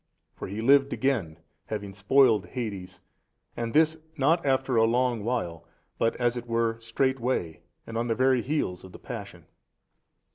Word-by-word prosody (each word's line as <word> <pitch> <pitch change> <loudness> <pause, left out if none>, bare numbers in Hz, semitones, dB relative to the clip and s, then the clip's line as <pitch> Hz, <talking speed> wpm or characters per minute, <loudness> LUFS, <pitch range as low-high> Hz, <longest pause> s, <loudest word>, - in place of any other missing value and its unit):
For - - -6
He 105 +4 -5
lived 140 +2 +5
again, 110 -13 -1 0.3
having 105 -2 -5
spoiled 110 +2 +3
Hades 100 -7 -6 0.5
and 115 -1 -3
this 160 +2 +3 0.2
not 160 +5 +3
after 135 -2 +1
a 115 0 +5
long 120 -1 +1
while 105 -9 -2 0.4
but 115 - +1
as 120 -1 0
it 120 0 -6
were 115 -1 0
straightway 120 - -1 0.2
and 115 - -8
on 120 - -1
the 115 - 0
very 130 0 +3
heels 125 - -2
of 95 - -12
the - - -9
Passion. - - -8
120 Hz, 155 wpm, -27 LUFS, 105-130 Hz, 0.5 s, lived